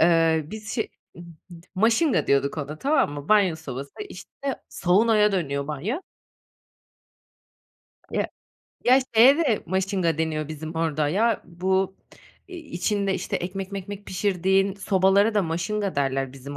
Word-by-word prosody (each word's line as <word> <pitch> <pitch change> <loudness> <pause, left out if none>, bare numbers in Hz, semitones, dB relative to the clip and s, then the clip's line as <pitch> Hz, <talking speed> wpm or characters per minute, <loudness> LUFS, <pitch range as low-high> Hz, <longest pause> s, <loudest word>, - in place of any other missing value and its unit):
eee, 165 -1 +4
biz 220 0 -6
şe 225 - -1 0.3
ıb 170 - -10 0.3
d 170 0 -13
maşingadiyorduk 220 - +2
ona 150 +1 -5
tamam 275 - +2
mı? 145 0 -8
Banyo 200 -6 +4
sobası, 140 -3 -7 0.2
işte, - - -11 0.4
saunaya 210 +3 +3
dönüyor 140 -6 -1
banyo. 165 - -3 2.1
Ya, - - 0 0.6
ya, 255 +2 +6 0.2
şeye 250 +6 +7
de 275 -10 +1
maşinga 185 -2 0
deniyor 155 -2 -1
bizim 155 +1 -7
orada 155 -2 0
ya 225 +8 +1
bu 190 +2 -1 0.5
i 365 - -8
içinde 200 - -1
işte 185 - -2
ekmek 190 +2 -5
mekmek 200 +1 -6
pişirdiğin 190 0 +1
sobalara 200 +2 +3
da 205 - +3
maşinga 185 +5 -2
derler 135 -1 0
bizim 140 +1 -9
185 Hz, 130 wpm, -24 LUFS, 160-210 Hz, 2.1 s, şeye